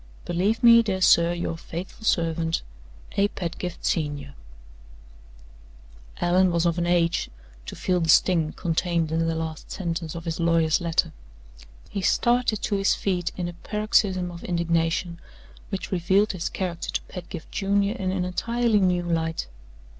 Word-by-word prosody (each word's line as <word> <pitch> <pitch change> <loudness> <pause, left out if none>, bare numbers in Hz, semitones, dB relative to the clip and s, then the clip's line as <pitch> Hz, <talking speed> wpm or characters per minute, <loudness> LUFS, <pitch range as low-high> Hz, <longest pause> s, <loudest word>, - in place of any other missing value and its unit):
"Believe 200 +7 0
me, 230 -1 +8
dear 200 -4 -2
sir, 170 -2 +5
your 170 -1 -3
faithful 175 +6 -8
servant, 165 -3 +1 0.5
"A. 200 0 +4
PEDGIFT, 180 -2 -5
Sen." 145 -3 -1 1.9
Allan 180 +2 +3
was 170 0 +1
of 170 0 +1
an 175 - 0
age 170 -1 +1 0.4
to - - -6
feel 180 -1 0
the 165 - -1
sting 165 -2 +4
contained 170 -2 -1
in 165 0 +1
the 165 - 0
last 160 -1 -5
sentence 165 -3 -4
of 165 0 -7
his 165 0 -3
lawyer's 165 -1 +2
letter. 170 -1 0 0.8
He 200 - -3
started 240 +1 +2
to 205 - 0
his 195 0 +2
feet 180 -3 -1
in 175 -2 -2
a 175 - -6
paroxysm 195 -2 0
of 170 0 -10
indignation, 170 0 0 0.5
which 195 -2 -5
revealed 190 +3 +2
his 185 -3 -3
character 175 -3 -4
to - - -1
Pedgift 175 -2 -9
Junior 200 +1 +1
in 190 -6 -2
an 185 -1 -1
entirely 230 +4 +1
new 180 -2 +2
light. 165 -1 -1
175 Hz, 150 wpm, -25 LUFS, 165-190 Hz, 1.9 s, me